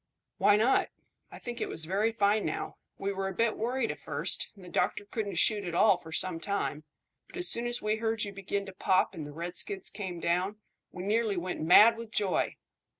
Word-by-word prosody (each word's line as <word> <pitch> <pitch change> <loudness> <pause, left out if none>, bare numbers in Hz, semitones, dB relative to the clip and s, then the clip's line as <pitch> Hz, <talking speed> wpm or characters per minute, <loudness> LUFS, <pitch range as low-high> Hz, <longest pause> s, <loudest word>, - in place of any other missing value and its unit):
"Why 205 - +6
not? 230 +6 +3 0.4
I - - -9
think 240 -1 -6
it - - -1
was 160 - -4
very 200 +6 +1
fine 210 -1 +2
now. - - -3 0.2
We 200 0 -2
were 195 0 -2
a 190 - -5
bit 230 -1 +1
worried 240 +1 -1
at - - -8
first, - - -1
and 190 -3 -14
the - - -11
doctor 180 +3 0
couldn't 205 -1 -4
shoot 210 -2 +2
at 175 -2 -4
all - - +6
for 160 - -11
some 170 0 0
time; 165 -5 -2 0.4
but - - -11
as 360 0 -1
soon 235 +1 0
as 240 0 0
we 215 +1 +1
heard 225 -1 0
you 200 - -4
begin 195 +1 -3
to 195 - -9
pop 185 0 +2
and 155 -3 -6
the - - -8
redskins 175 +4 -3
came 190 -4 -5
down, 180 +5 0 0.4
we 180 - -7
nearly 215 0 +1
went 180 +1 -3
mad 210 +8 +7
with 230 -1 -7
joy. 205 -4 0
200 Hz, 215 wpm, -30 LUFS, 180-220 Hz, 0.4 s, mad